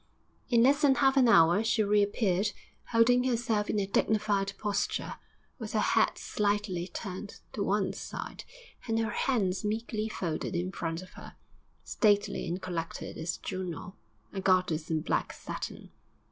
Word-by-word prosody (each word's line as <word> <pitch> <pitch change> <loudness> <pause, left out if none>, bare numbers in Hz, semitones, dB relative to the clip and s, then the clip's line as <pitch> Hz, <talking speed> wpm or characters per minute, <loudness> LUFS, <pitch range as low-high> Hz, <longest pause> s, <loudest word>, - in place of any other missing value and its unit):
In 235 -2 +5
less 280 +3 +4
than 280 -3 +5
half 270 -1 +3
an 260 -3 +5
hour 175 -1 +6
she 225 -1 +2
reappeared, 205 -1 +2 0.3
holding 245 +2 +4
herself 230 -4 0
in - - 0
a 200 - 0
dignified 200 0 +1
posture, 205 -1 -1 0.5
with - - -6
her - - +2
head - - +2
slightly 205 -4 -1
turned 195 +2 -7
to 210 - -3
one 200 0 +1
side - - -7 0.4
and 225 -1 +1
her 225 -1 0
hands 210 -8 0
meekly 220 +1 -2
folded 175 -3 -3
in 180 +2 -1
front 165 -1 -4
of 185 - -14
her, - - -12 0.5
stately 205 -2 +1
and 180 +3 -3
collected 170 -3 -4
as 165 +1 -3
Juno, 185 0 -5 0.4
a 195 - -3
goddess 180 -4 +2
in 160 -1 0
black - - -1
satin. - - -7
205 Hz, 150 wpm, -30 LUFS, 185-225 Hz, 0.5 s, hour